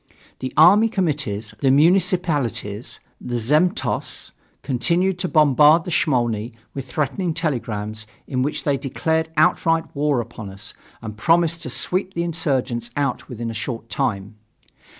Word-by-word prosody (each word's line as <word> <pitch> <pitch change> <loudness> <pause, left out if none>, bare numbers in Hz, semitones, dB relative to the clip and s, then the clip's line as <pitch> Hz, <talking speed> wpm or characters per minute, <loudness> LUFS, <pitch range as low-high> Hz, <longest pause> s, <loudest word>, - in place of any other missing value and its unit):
The 130 - -4
army 200 +8 +7
committees, 135 - -2
the 135 - +2
municipalities, 150 - +1 0.2
the 120 - -3
zemstvos 150 - 0 0.3
continued 175 +8 0
to 180 - -1
bombard 150 0 +5
the 180 - -6
Smolny 120 -7 0 0.2
with 135 -2 -7
threatening 155 +6 -1
telegrams 110 -9 -3 0.2
in 130 -1 -2
which 145 +3 -1
they 140 -2 +1
declared 160 +4 -1
outright 165 0 +2
war 145 -2 +1
upon 110 -3 -7
us 100 +2 -8 0.3
and 110 -2 -6
promised 165 +6 +2
to 130 - -5
sweep 185 +10 -2
the 170 - 0
insurgents 135 -8 -1
out 140 -3 -2
within 115 -2 -5
a - - -6
short 115 +1 -5
time. 105 -5 -2
140 Hz, 135 wpm, -21 LUFS, 120-165 Hz, 0.3 s, army